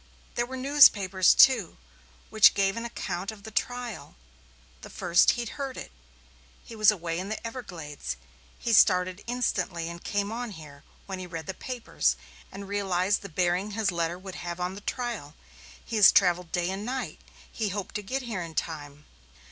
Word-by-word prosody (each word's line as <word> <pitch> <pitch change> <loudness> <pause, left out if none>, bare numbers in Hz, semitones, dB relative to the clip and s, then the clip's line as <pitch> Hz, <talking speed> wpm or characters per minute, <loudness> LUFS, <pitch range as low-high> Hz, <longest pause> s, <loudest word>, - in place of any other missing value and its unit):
There 240 0 -1
were 260 +1 -6
newspapers, 205 -9 +5
too, 235 -10 +5 0.5
which 215 -2 +7
gave 195 -1 +2
an 230 0 -4
account 195 -4 -4
of 210 -2 -14
the 220 - -9
trial 235 -9 -4 0.7
the - - -10
first 175 0 +3
he'd 240 -2 -3
heard 270 -2 -4
of - - -4
it - - -17 0.7
he 230 - -11
was 215 -2 +5
away 170 -5 -1
in 190 +2 -5
the 215 - -2
Everglades. 175 - -6 0.4
He 235 - -1
started 185 -2 +4
instantly, 195 -9 -1
and 170 0 -9
came 205 0 -1
on 235 -1 -4
here 150 -4 -12 0.2
when 190 -1 -6
he - - -5
had 180 - -14
read 160 -1 -5
the 190 - -4
papers, 245 +5 -1 0.4
and 200 0 -8
realized 195 -1 0
the 200 - -8
bearing 180 +4 0
his 215 -3 +1
letter 170 0 -1
would 190 0 -9
have 175 0 -5
on 180 +1 -2
the 200 - -9
trial. 225 - -4 0.5
He 230 - -3
has 205 - +9
travelled 180 -3 +3
day 175 0 0
and 195 +2 -4
night. 245 -7 -4 0.3
He 220 -3 -2
hoped 195 0 -5
to 210 - -3
get 260 +7 -3
here 220 -7 -4
in 165 -2 -7
time. 150 -2 -5
195 Hz, 185 wpm, -27 LUFS, 175-225 Hz, 0.7 s, has